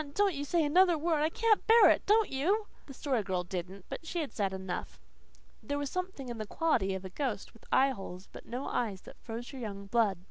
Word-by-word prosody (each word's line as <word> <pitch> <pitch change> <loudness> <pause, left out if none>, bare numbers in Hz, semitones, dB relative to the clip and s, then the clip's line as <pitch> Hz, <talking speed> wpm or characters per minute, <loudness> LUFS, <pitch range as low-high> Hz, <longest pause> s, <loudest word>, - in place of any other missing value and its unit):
Don't 405 -2 +3
you 285 -1 -3
say 320 +2 +1
another 350 +3 +5
word! 315 -1 +1
I 310 - +3
can't 445 +4 +2
bear 455 +1 +8
it! - - 0
Don't 435 +1 +4
you!" 370 +11 +1 0.2
The 275 - -9
Story 260 -6 0
Girl 185 -3 -1
didn't. 185 +1 -6
But - - -6
she 340 +2 -3
had 295 - -5
said 200 -3 0
enough. 190 -1 -5 0.6
There 285 -1 -3
was 285 -2 -3
something 365 -7 -4
in 240 -2 -5
the 215 - -4
quality 200 - +1
of 190 0 -6
a - - -5
ghost 235 -5 -3
with 230 - -19
eyeholes 195 -9 +1
but - - -12
no 250 +4 -4
eyes 205 -6 -2
that - - -14
froze 235 +3 -7
our 265 - -7
young 200 -4 -6
blood. 210 -2 +2
260 Hz, 225 wpm, -31 LUFS, 200-325 Hz, 0.6 s, bear